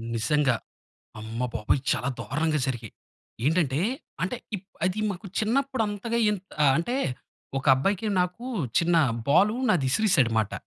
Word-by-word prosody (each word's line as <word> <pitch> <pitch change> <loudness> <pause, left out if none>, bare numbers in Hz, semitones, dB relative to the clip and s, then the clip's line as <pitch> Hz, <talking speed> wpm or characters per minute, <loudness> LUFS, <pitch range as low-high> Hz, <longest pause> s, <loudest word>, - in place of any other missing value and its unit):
నిజంగా! 125 +3 +2 0.7
అమ్మబాబోయ్! 115 +2 -1
చాలా 125 - -1
దారుణంగా 155 +2 0
జరిగాయి, 120 -5 -4 0.5
ఏంటంటే, 150 -4 +2 0.4
అంటే, 190 +7 -1 0.2
ఇప్ 185 - -12 0.2
అది, 185 +3 0
మాకు 195 +2 -6
చిన్నప్పుడు, 260 +2 +1
అంతగా 225 +3 -2
ఏం 210 - 0 0.3
ఆహ్, 135 - +6
అంటే 240 +10 -1 0.6
ఒక 135 - -7
అబ్బాయికి, 195 +10 0
నాకు, 180 +7 -2 0.3
చిన్న 170 0 +2 0.3
బాలూ 195 +10 +4
నాది 145 -9 +2
విసిరేసాడు 135 - +3
మాట. 105 -2 0
165 Hz, 130 wpm, -26 LUFS, 130-205 Hz, 0.7 s, ఆహ్